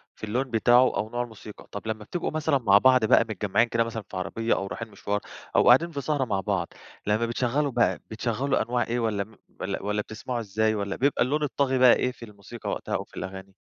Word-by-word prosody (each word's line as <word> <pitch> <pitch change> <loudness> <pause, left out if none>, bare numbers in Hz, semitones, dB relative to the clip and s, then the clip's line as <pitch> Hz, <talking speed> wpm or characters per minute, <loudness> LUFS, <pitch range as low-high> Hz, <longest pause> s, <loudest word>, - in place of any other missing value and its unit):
في - - -22
اللون 120 +5 0
بتاعه 120 +3 +4
أو 110 - -2
نوع 120 +1 -2
الموسيقى. 110 -2 -11
طب 100 +2 -7
لما 110 -1 -3
بتبقوا 175 +8 -3
مثلًا 155 -2 +1
مع 100 -5 +5
بعض 130 0 +5
بقى - - +6
متجمعين 105 +3 +1
كده 115 0 +1
مثلًا 115 -2 -5
في 95 - -6
عربية 115 +5 -1
أو 95 - -3
رايحين 115 +2 -6
مشوار 100 +1 -2 0.4
أو - - +4
قاعدين 165 +8 +6
في 140 -2 -4
سهرة 145 -2 0
مع 100 -4 -1
بعض، 95 -3 -2 0.3
لما 110 +3 +2
بتشغلوا 130 +5 0
بقى 120 -1 +2
بتشغلوا 120 +5 0
أنواع 120 0 0
إيه، 120 +1 -1
والّا 110 -4 0
م 110 +2 -18 0.2
والّا - - -3
والّا 105 +1 0
بتسمعوا 115 +4 -5
إزاي، 110 0 0
والّا 100 -1 -2
بيبقى 140 -1 +2
اللون 150 +4 0
الطاغي 140 -2 0
بقى 125 -1 +7
إيه 125 - 0
في 120 -2 -11
الموسيقى 105 +2 -9
وقتها - - -3
أو - - -2
في - - -17
الأغاني؟ 95 +2 -7
115 Hz, 225 wpm, -26 LUFS, 105-125 Hz, 0.4 s, بقى